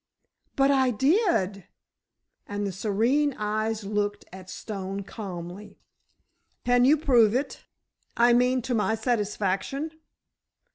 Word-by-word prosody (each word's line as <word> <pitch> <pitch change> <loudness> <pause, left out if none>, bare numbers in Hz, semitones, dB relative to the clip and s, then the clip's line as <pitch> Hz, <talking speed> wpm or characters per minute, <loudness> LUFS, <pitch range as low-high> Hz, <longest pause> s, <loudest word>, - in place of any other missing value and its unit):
"But 275 0 +4
I 265 -2 +3
did," 245 - +1 0.8
and 205 0 -3
the 200 - -2
serene 230 +9 +1
eyes 215 +1 -2
looked 205 0 -2
at 185 -1 -11
Stone 195 -1 -5
calmly. 190 -1 -8 0.9
"Can 245 0 +4
you 295 +4 +5
prove 240 -7 +4
it—I 245 -2 -2
mean, 250 +1 +2
to 250 - -2
my 220 0 +1
satisfaction? 220 +5 -1
220 Hz, 105 wpm, -26 LUFS, 200-255 Hz, 0.9 s, you